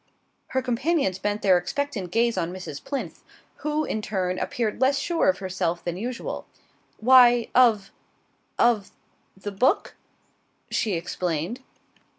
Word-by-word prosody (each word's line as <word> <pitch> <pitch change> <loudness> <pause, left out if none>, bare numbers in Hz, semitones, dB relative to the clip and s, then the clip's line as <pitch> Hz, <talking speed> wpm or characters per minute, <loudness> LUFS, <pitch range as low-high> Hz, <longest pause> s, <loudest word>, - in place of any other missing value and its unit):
Her 260 0 -1
companions 250 - 0
bent 205 +1 -2
their 185 -2 +5
expectant 230 -2 -3
gaze 230 +5 +2
on 165 +1 -1
Mrs. 180 -6 -7
Plinth, 280 - -5 0.4
who, 300 0 -1
in 215 - -2
turn, 185 -3 -2
appeared 225 0 -2
less 270 +1 +4
sure 340 - +1
of 185 - +2
herself 185 -3 -2
than 175 -1 -3
usual. 235 +5 -5 0.5
"Why, 245 0 +6
of 225 -6 +4 0.7
of 230 -4 +3 0.5
the 205 +1 -6
book," 255 - +1 0.8
she 215 - 0
explained. 170 +4 -2
215 Hz, 130 wpm, -25 LUFS, 185-255 Hz, 0.8 s, Why